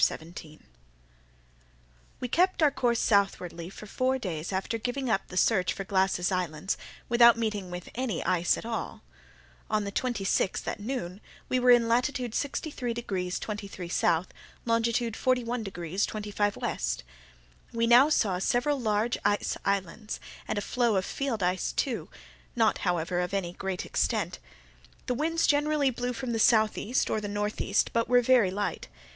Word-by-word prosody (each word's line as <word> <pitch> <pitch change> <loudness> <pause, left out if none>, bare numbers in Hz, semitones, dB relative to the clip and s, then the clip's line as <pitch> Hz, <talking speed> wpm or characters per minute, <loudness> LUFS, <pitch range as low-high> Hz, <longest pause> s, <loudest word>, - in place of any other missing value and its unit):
CHAPTER - - +4
17 160 -1 -12 1.6
We 250 - -1
kept 355 +5 +2
our 295 - +5
course 240 -3 +1
southwardly 180 -5 +1
for 205 - -10
four 255 +5 0
days 175 -8 -4
after 195 +4 -2
giving 245 +1 -2
up 195 - 0
the 180 - -7
search 185 -2 +3
for 195 - -5
Glass's 190 -1 +1
islands, 180 -1 -1 0.3
without 235 -1 +6
meeting 210 -5 -2
with 180 0 -7
any 235 -8 -2
ice 175 -1 +2
at - - -7
all. 230 -1 -4 0.7
On 215 -1 +1
the 200 - -4
twenty 240 -1 -2
sixth, 195 0 0
at - - -3
noon, 205 -4 -4 0.3
we 255 - +2
were 250 0 +3
in 240 -1 +6
latitude 245 0 0
63 270 -3 -3
degrees 185 -6 -3
23' 200 -4 -6
S., 170 0 +2 0.4
longitude 230 0 +1
41 250 -2 0
degrees 190 -2 -2
25' 205 -1 -1
W. - - -3 0.9
We 230 0 +1
now 245 +5 +7
saw 200 -11 +2
several 245 +8 +1
large 220 +1 0
ice 205 0 +1
islands, 200 +2 -2 0.3
and - - -2
a - - 0
floe 235 0 +1
of 190 -1 +1
field 255 -8 -2
ice, 180 +1 0 0.8
not, 225 -2 +2
however, 175 -1 0
of 180 +2 -1
any 175 -3 -2
great 190 -1 -4
extent. - - -1 0.7
The - - 0
winds 325 +5 +1
generally 290 -1 +2
blew 245 +1 -3
from 255 0 -4
the 225 - -1
southeast, 220 +2 +3
or 215 - 0
the 205 - -4
northeast, 205 0 0
but 230 0 +1
were 245 0 +5
very 240 -5 +5
light. 205 +2 -3
215 Hz, 160 wpm, -28 LUFS, 190-245 Hz, 1.6 s, now